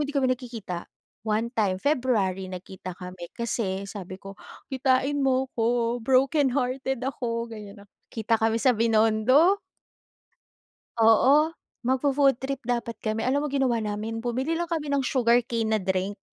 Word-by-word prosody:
hindi - - -5
kami 265 -2 +3
nagkikita. 230 -8 -6 0.4
One 220 +2 0
time, 195 -4 +1
February 215 -10 0
nagkita 185 0 -8
kami 180 -1 -8
kasi 200 -4 -2
sabi 190 -1 -8
ko, 195 0 -9 0.4
"Kitain 265 +2 +1
mo 265 0 +2
ko 235 +1 +1
brokenhearted 265 0 +1
ako." 235 -3 -2
ganyan. 205 -2 -10 0.2
Kita 225 0 0
kami 225 0 +2
sa 255 -2 +4
Binondo. 230 - +4 1.4
Oo. 275 +8 +5 0.3
Magfo-food 270 +1 +2
trip 265 +1 -4
dapat 235 -1 -1
kami. 215 0 -2
Alam 285 +3 +1
mo - - -3
ginawa 265 -4 +1
namin? 215 +2 -3
Bumili 250 +6 -2
lang 340 0 -1
kami 300 -4 -2
ng 280 - +2
sugarcane 240 -3 +2
na 220 0 +1
drink, 190 +2 -2
235 Hz, 135 wpm, -26 LUFS, 215-265 Hz, 1.4 s, Oo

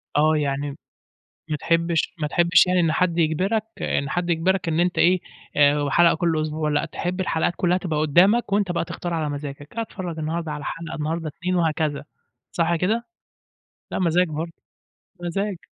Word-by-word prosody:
آه، 155 +2 +4
يعني 140 -1 -1
م - - -10 0.8
ما 150 - 0
تحبش 165 +1 0
ما 150 - +1
تحبش 170 +2 +4
يعني 180 0 +2
إن 165 -2 +2
حد 170 0 +1
يجبرك 185 +7 +1 0.2
إن 140 - -1
حد 175 0 -1
يجبرك 175 +2 +1
إن 160 0 +1
أنت 180 +1 +1
إيه 180 +1 +4 0.4
آآ، 145 0 +5
وحلقة 165 +4 +4
كل 160 -1 0
أسبوع 155 0 -2
لأ 145 +1 +1
تحب 175 +3 -4
الحلقات 170 -3 0
كلّها 180 0 +2
تبقى 165 -5 -2
قدّامك، 185 +10 +4
وأنت 200 -3 +2
بقى 170 - -1
تختار 175 +1 -5
على 155 -2 -1
مزاجك، 145 +5 -7
أتفرّج 185 -7 -4
النهارده 160 0 -3
على 150 0 -6
حلقة 165 0 -5
النهارده 160 +1 -2
2 180 +5 -2
وهكذا 155 -4 0 0.5
صح 170 0 +1
كده؟ 220 +8 0 0.9
لا - - -2
مزاج 180 0 +3
برضه، 160 +2 -4 0.7
مزاج. 195 +3 -2
165 Hz, 170 wpm, -23 LUFS, 155-180 Hz, 0.9 s, آآ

